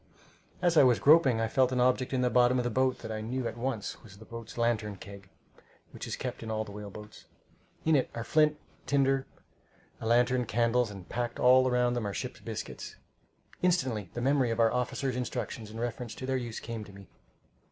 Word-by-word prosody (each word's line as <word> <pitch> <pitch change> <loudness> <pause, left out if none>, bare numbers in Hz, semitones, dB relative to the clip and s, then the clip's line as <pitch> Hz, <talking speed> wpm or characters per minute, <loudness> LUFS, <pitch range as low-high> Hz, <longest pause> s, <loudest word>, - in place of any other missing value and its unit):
As 175 -2 +3
I - - +9
was 125 -3 +5
groping, 140 -6 +5
I 115 - +1
felt 130 +2 +2
an 125 - 0
object 125 +1 +2
in 130 -2 +1
the 125 -1 +2
bottom 125 0 +4
of 125 - +1
the 120 - -1
boat 130 +1 +2
that 110 - -5
I 110 0 -3
knew 120 +3 -2
at - - -5
once 120 -3 -3
was 100 -3 -14
the 110 - -13
boat's 115 0 -9
lantern 115 -3 0
keg, 100 0 -12 0.6
which - - -7
is - - -3
kept - - -5
in 110 - -6
all 110 0 -1
whale 105 0 -8
boats. 105 +1 -12 0.6
In 160 -1 +4
it 135 - +2
are 115 - -3
flint, 150 +3 +3 0.3
tinder, 135 -1 +2 0.7
a 110 - -4
lantern, 125 +1 +3
candles, 115 +1 +1
and 95 -3 -10
packed 120 0 -3
all 130 +1 +6
around 125 -1 +2
them 120 -4 -2
are 100 - -4
ship's - - -5
biscuits. - - -6 0.7
Instantly 130 - +1
the 120 - -2
memory 135 -1 +2
of 115 0 -2
our 115 -1 +4
officers' 125 +1 -1
instructions 115 -3 -4
in 110 +1 -8
reference 120 0 -4
to 130 - -6
their 130 0 0
use 120 -3 -3
came 115 -2 -6
to 100 - -13
me. 100 0 -13
120 Hz, 210 wpm, -30 LUFS, 110-130 Hz, 0.7 s, I